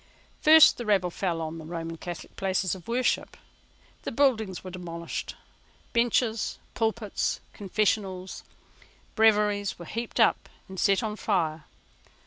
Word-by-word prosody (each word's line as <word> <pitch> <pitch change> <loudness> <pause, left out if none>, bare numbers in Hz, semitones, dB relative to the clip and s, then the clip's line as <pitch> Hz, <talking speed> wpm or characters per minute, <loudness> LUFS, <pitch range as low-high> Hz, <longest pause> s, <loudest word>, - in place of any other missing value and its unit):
First 315 0 +8
the 240 - -4
rabble 190 -4 +2
fell 170 -2 -2
on 160 +1 -5
the - - -8
Roman 165 0 -5
Catholic 175 +1 -8
places 190 -1 0
of 185 -3 -9
worship. 245 +2 0 0.6
The - - -4
buildings 225 -8 +1
were 185 - -7
demolished. 170 -2 -6 0.6
Benches, 235 -1 +1 0.2
pulpits, 220 -2 -1
confessionals, 195 -2 -1 0.7
breviaries 210 -2 +3
were 170 - -9
heaped 230 +7 -4
up - - +3 0.2
and 190 -1 -8
set 200 +3 +3
on 215 -1 -3
fire. 160 -8 -1
195 Hz, 125 wpm, -27 LUFS, 175-220 Hz, 0.7 s, First